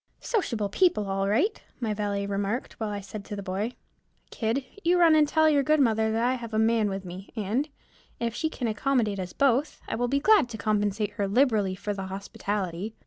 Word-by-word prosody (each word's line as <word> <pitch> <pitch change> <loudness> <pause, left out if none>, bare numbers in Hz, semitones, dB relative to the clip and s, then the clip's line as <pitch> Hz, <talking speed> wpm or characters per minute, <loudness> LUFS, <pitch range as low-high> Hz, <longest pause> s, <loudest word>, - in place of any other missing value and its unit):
"Sociable 235 - -1
people 215 - +2
all 195 0 0
right," 330 - +1 0.2
my 225 -4 -1
valet 205 -1 -2
remarked, 200 +4 -2
while 220 -2 -2
I 205 -1 -4
said 200 +1 -8
to 205 - -6
the 200 - -6
boy, 200 +5 -2 0.6
"Kid, 235 +4 -1 0.2
you 350 +2 +4
run 335 -2 +6
and 305 -1 +5
tell 315 +1 +3
your 295 -2 +4
good 305 +3 +3
mother 220 -4 +3
that 225 +1 0
I 250 - +2
have 230 -3 -5
a - - +2
man 220 -1 +3
with 195 0 -4
me, 185 +2 -8
and, 225 +8 -1 0.5
if 235 -1 -1
she 315 +6 -1
can 250 -6 -3
accommodate 220 -2 0
us 180 -1 -4
both, 275 +2 +1
I - - -3
will 245 +1 0
be 275 +3 +1
glad 400 - +5
to 225 - -6
compensate 210 0 0
her 205 -1 -2
liberally 210 -4 +2
for 205 +2 -3
the 195 -1 -5
hospitality." 195 0 -4
220 Hz, 210 wpm, -27 LUFS, 200-260 Hz, 0.6 s, run